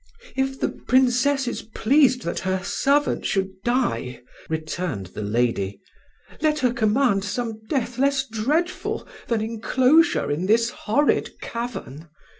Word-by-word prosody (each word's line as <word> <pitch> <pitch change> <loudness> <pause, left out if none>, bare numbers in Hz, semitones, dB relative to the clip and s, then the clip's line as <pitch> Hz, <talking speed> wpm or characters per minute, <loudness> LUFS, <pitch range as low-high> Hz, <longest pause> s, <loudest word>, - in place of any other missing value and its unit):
"If 265 0 -1
the - - +1
Princess 260 +1 +2
is 240 - -3
pleased 250 +3 +2
that 170 - -2
her 185 0 -1
servant 285 +8 +1
should 195 -1 0
die," 235 - -1 0.3
returned 160 - -3
the 105 - -5
lady, 105 -2 0 0.6
"let 305 -1 +2
her 250 -4 +1
command 220 -2 +2
some 220 +2 -3
death 255 -3 -1
less 275 0 +2
dreadful 290 +11 -1 0.2
than 230 -2 0
enclosure 255 - +2
in 165 +6 -1
this 230 +2 +3
horrid 285 +8 0
cavern. 225 - -6
235 Hz, 125 wpm, -23 LUFS, 185-265 Hz, 0.6 s, this